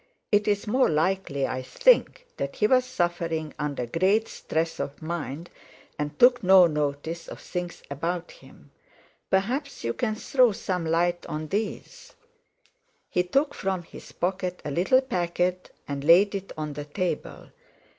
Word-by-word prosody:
It's 205 0 +2
more 255 +5 +3
likely 160 -3 0
I 130 0 -3
think - - +3
that 140 0 -3
he - - +2
was 255 +3 +4
suffering 170 -8 -2
under 145 -4 -2
great 190 - +2
stress 165 +1 -3
of 140 - -4
mind, 165 0 -5 0.5
and 150 0 -3
took 245 0 +6
no 190 -2 +7
notice 150 +1 -2
of - - -9
things 175 -1 -5
about 170 +5 -3
him. - - -18 0.6
Perhaps 250 +10 -1
you 115 0 -1
can 215 - -1
throw 250 0 +3
some 180 -3 -3
light 175 +2 +1
on 155 0 -5
these." 220 - -4 1.0
He 180 - +2
took 275 +12 +1
from 190 -2 -2
his - - -13
pocket 180 0 -2
a 150 - -3
little 185 - +3
packet 180 -6 -1 0.2
and 140 -1 -4
laid 180 +7 +6
it 195 -1 -5
on 150 -1 -4
the 145 0 -6
table. 170 +1 -4
175 Hz, 145 wpm, -26 LUFS, 155-205 Hz, 1.0 s, no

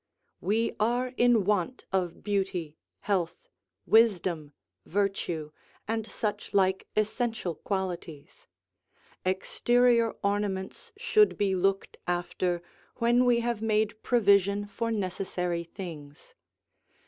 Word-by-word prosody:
We 225 +4 0
are 245 +3 +1
in 240 -4 +4
want 205 +4 0
of 180 -3 -1
beauty, 190 -6 -1 0.3
health, 185 -5 -1 0.4
wisdom, 185 -9 +3 0.3
virtue, 175 -5 -1 0.4
and 225 0 -2
such 210 -2 -3
like 190 -1 +2
essential 215 -3 0
qualities: 175 -5 -5 0.8
exterior 235 +5 +2
ornaments 200 - -2
should, 430 -1 +3
be 200 -2 +1
looked 195 +1 0
after 175 0 -1 0.3
when 240 +1 +3
we 240 -1 +4
have 235 -2 -2
made 215 -1 0
provision 200 -3 +3
for 230 +3 -3
necessary 185 -4 -2
things. 160 -5 -10
200 Hz, 100 wpm, -28 LUFS, 180-225 Hz, 0.8 s, in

